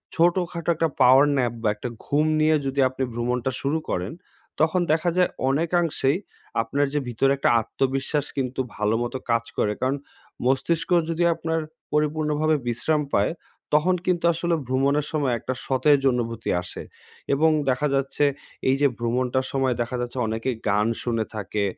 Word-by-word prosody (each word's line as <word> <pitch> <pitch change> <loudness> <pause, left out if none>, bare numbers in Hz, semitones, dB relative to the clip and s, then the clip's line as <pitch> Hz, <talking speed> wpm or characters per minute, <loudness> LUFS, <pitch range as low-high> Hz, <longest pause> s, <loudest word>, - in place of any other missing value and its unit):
ছোটখাটো 175 0 +1
একটা 165 0 +1
power 130 +3 +7
nap 120 -3 +1
বা 110 - +3
একটা 105 +4 -5 0.2
ঘুম 150 +2 +2
নিয়ে 155 0 +4
যদি 135 +1 -2
আপনি 130 +1 -3
ভ্রমণটা 125 +2 -1
শুরু 140 +3 0
করেন, 90 +3 -2 0.5
তখন 160 +3 +3
দেখা 165 +2 +2
যায় 180 -1 +4 0.2
অনেকাংশেই 160 -1 +1 0.4
আপনার 145 +1 0
যে 150 - +2
ভিতরে 125 +3 +1
একটা 140 - +2
আত্মবিশ্বাস 135 +4 -1
কিন্তু 130 -1 -2 0.2
ভালো 105 +1 +1
মতো 120 +2 -3
কাজ 115 0 +2
করে। 105 - +1
কারণ 130 +2 +1 0.5
মস্তিষ্ক 135 +7 +1 0.2
যদি 165 +1 0
আপনার 165 0 -1 0.3
পরিপূর্ণভাবে 150 0 +1
বিশ্রাম 135 +6 +1
পায়, 100 - +3 0.4
তখন 175 +5 +4
কিন্তু 175 -2 +1
আসলে 170 +1 0
ভ্রমণের 140 +3 +1
সময় 140 -5 0
একটা 130 - -3
সতেজ 135 +2 +3
অনুভূতি 115 -2 -3
আসে। 90 - -7 0.5
এবং 160 +3 +4 0.2
দেখা 130 +3 +1
যাচ্ছে 135 +2 0 0.5
এই 130 - +4
যে 145 - +6
ভ্রমণটার 125 +2 0
সময়, 135 -2 +1
দেখা 120 +2 -2
যাচ্ছে 120 +1 -5
অনেকেই 115 +3 -2
গান 105 +2 +2 0.2
শুনে 115 -2 0
থাকে, 105 0 -2
135 Hz, 155 wpm, -24 LUFS, 120-155 Hz, 0.5 s, power